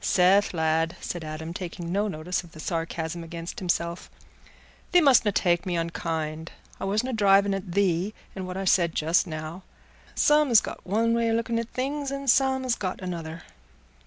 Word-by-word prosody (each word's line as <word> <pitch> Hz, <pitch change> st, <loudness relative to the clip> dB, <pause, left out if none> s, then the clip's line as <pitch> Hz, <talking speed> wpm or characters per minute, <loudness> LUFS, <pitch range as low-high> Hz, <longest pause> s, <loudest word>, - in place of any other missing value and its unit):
"Seth, 190 Hz, +3 st, +4 dB
lad," 160 Hz, 0 st, 0 dB
said 175 Hz, -2 st, -5 dB
Adam, 155 Hz, +2 st, -6 dB
taking 175 Hz, -1 st, -6 dB
no 205 Hz, +3 st, +1 dB
notice 180 Hz, 0 st, -3 dB
of 170 Hz, -, -16 dB
the 155 Hz, -, -12 dB
sarcasm 165 Hz, 0 st, -3 dB
against 170 Hz, +6 st, -7 dB
himself, 170 Hz, -2 st, -2 dB, 0.8 s
"thee 360 Hz, -, +6 dB
mustna 265 Hz, -9 st, +5 dB
take 175 Hz, -2 st, +2 dB
me 180 Hz, -3 st, -2 dB
unkind. 160 Hz, -1 st, -3 dB, 0.3 s
I -, -, -3 dB
wasna 215 Hz, +6 st, 0 dB
driving 200 Hz, -2 st, +4 dB
at 185 Hz, -3 st, -5 dB
thee 195 Hz, +1 st, +1 dB, 0.2 s
in 190 Hz, -1 st, -5 dB
what 185 Hz, 0 st, -5 dB
I 195 Hz, -, -3 dB
said 170 Hz, -3 st, +3 dB
just 165 Hz, +5 st, +2 dB
now. 155 Hz, +2 st, -6 dB, 0.5 s
Some 295 Hz, -1 st, +4 dB
's 230 Hz, -3 st, +7 dB
got -, -, -7 dB
one 225 Hz, +4 st, +2 dB
way 230 Hz, 0 st, +1 dB
o' -, -, +1 dB
looking 230 Hz, 0 st, 0 dB
at 230 Hz, 0 st, -4 dB
things 280 Hz, +2 st, -2 dB
and 275 Hz, 0 st, -5 dB
some 265 Hz, +1 st, +3 dB
's 245 Hz, -, +3 dB
got 185 Hz, -5 st, -3 dB
another." 170 Hz, -2 st, -6 dB
185 Hz, 180 wpm, -26 LUFS, 165-220 Hz, 0.8 s, s